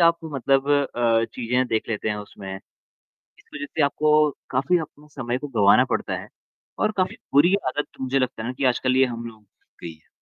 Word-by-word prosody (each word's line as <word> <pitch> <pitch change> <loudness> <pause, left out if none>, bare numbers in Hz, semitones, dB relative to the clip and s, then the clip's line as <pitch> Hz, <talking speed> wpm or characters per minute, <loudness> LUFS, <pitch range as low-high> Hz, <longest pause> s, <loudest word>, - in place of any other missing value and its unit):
आप 170 0 +5
मतलब 135 -2 0
अ, 120 -5 +2
चीज़ें 125 +1 0
देख 110 - -1
लेते 110 -1 -2
हैं 105 - -1
उसमें। 100 -2 -8 0.6
इस - - -28
वजह 145 -1 -4
से 155 - -1
आपको 150 +1 +3 0.2
काफ़ी 140 +7 +2
अपने 150 -1 -9
समय 125 -2 -2
को 145 - -6
गँवाना 105 -6 +5
पड़ता - - -1
है - - -13 0.5
और 215 - +1
काफ़ी 185 -1 0 0.2
बुरी 175 +7 +6
आदत 145 +3 -2
मुझे 130 +1 0
लगता 130 -3 -2
है 115 - -4
ना - - -2
कि 140 - -1
आजकल 130 +1 +2
ये 135 - +6
हम 120 -1 -6
लोगों 110 -2 -11
को 105 - -33 0.2
लग - - -13
गई - - -8
है। 80 - -27
130 Hz, 210 wpm, -24 LUFS, 115-145 Hz, 0.6 s, बुरी